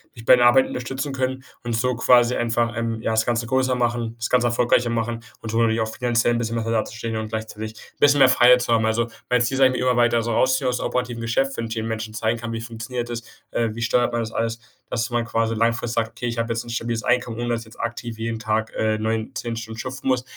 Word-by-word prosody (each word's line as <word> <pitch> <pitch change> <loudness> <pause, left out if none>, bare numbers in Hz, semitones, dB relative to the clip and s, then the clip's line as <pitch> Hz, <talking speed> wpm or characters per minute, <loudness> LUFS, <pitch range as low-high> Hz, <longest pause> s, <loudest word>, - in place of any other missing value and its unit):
mich 115 - -11
bei 120 - +7
der 120 - +4
Arbeit 130 +2 +6
unterstützen 130 +3 -4
können 130 0 -2 0.2
und 120 - -2
so 125 +2 +1
quasi 120 +1 +4
einfach, 115 0 0
ähm, 115 -1 -2
ja, 110 - -1
das 110 0 +2
Ganze 120 -1 0
größer 130 +1 +1
machen. 120 -2 -1
Das 115 0 -4
Ganze 125 -1 +3
erfolgreicher 120 0 +2
machen 115 0 -1 0.2
und 110 - -5
so 115 - +1
natürlich 115 -1 +2
auch 110 0 -2
finanziell 120 -1 +1
'n - - +1
bisschen 115 0 -2
besser 115 0 -1
dazustehen 110 0 -2
und 110 0 -3
gleichzeitig 110 0 -5
'n - - -17
bisschen 145 0 +5
mehr 135 -1 +7
Freiheit 125 0 +6
zu 120 - -2
haben. 115 -1 +3
Also, 115 +1 +1 0.2
mein 125 -1 +3
Ziel 120 +3 0
ist 135 - 0
eigentlich, 130 -1 +6
mich 125 - -2
immer 125 -1 +2
weiter 120 -1 +3
so 115 - -2
rausziehen 130 +3 +2
aus 125 - 0
dem - - -3
operativen 125 -2 -2
Geschäft. 135 +4 0
Wenn 115 - -2
ich 110 - -5
eben 110 0 -2
Menschen 110 -1 -4
zeigen 110 +1 -1
kann: 115 0 -5
„Wie 115 - -4
funktioniert 115 +1 -5
das, 120 -1 -4 0.3
äh, 115 - +1
wie 115 - -6
steuert 120 +1 +2
man 120 - 0
das 110 -1 -4
alles?", 115 0 -2 0.3
dass 120 0 -1
man 120 -1 0
quasi 115 0 0
langfristig 115 +1 0
sagt: 115 -1 +1
„Okay, 115 +2 -5
ich 115 0 -3
habe 115 0 0
jetzt 115 - -3
'n - - -11
stabiles 115 -1 -2
Einkommen, 120 -2 0
ohne 120 - -2
dass 115 -1 0
ich - - -11
jetzt 110 - -11
aktiv 115 -1 -4
jeden 115 0 -3
Tag, 110 0 -1
äh, 110 0 +1
9, 110 +1 -2
10 120 -1 -4
Stunden 115 0 -7
schuften 130 +2 -6
muss.” 130 -1 +2
115 Hz, 270 wpm, -23 LUFS, 115-120 Hz, 0.3 s, bei